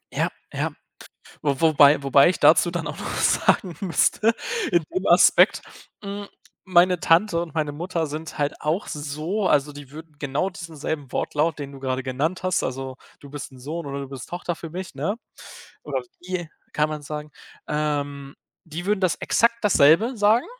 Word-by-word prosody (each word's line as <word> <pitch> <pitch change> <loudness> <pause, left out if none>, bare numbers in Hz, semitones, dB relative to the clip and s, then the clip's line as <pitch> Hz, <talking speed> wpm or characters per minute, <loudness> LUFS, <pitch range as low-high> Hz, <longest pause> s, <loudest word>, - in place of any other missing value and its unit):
Ja, - - +1 0.2
ja. - - -1 0.7
Wo 140 -3 -1
wobei 150 -3 +6
wobei 140 +1 +5
ich 180 - -1
dazu 165 +2 +6
dann 175 -2 -3
auch - - -6
noch - - -4
sagen 180 -6 +2
müsste, 200 +5 +2 0.4
in 170 -1 +4
dem 185 +1 -2
Aspekt, 175 +1 +5 0.4
hm, 200 0 -6 0.4
meine 180 -1 +4
Tante 170 +1 +3
und 170 -3 -6
meine 155 -2 0
Mutter 170 +1 -2
sind 155 +2 -7
halt 145 -1 -1
auch 155 +7 -1
so, 155 +7 -3
also 150 -3 +2
die 145 -2 -11
würden 155 0 -11
genau 145 +6 -1
diesen 165 -3 -9
selben 145 -2 -4
Wortlaut, 155 +2 0
den 140 -1 -5
du 135 - -10
gerade 130 0 -2
genannt 140 +8 -2
hast, 185 -1 +1
also 130 0 -4 0.2
du 140 - -13
bist 145 -1 -7
'n 130 - -14
Sohn 155 +5 -5
oder 140 0 -4
du 140 - -7
bist 135 -2 -8
Tochter 175 -1 -4
für 165 - -8
mich, 180 0 -7
ne? 155 +9 -1 0.7
Oder - - -2 0.2
die 175 -3 -3 0.2
kann 150 0 +1
man 155 -1 -5
sagen, 150 +1 -6 0.4
ähm, 145 -2 -2 0.3
die 165 +1 -6
würden 210 -1 +1
das 185 -3 +2
exakt 235 0 +2
dasselbe 205 - +5
sagen. 215 +4 +3
155 Hz, 180 wpm, -24 LUFS, 145-180 Hz, 0.7 s, wobei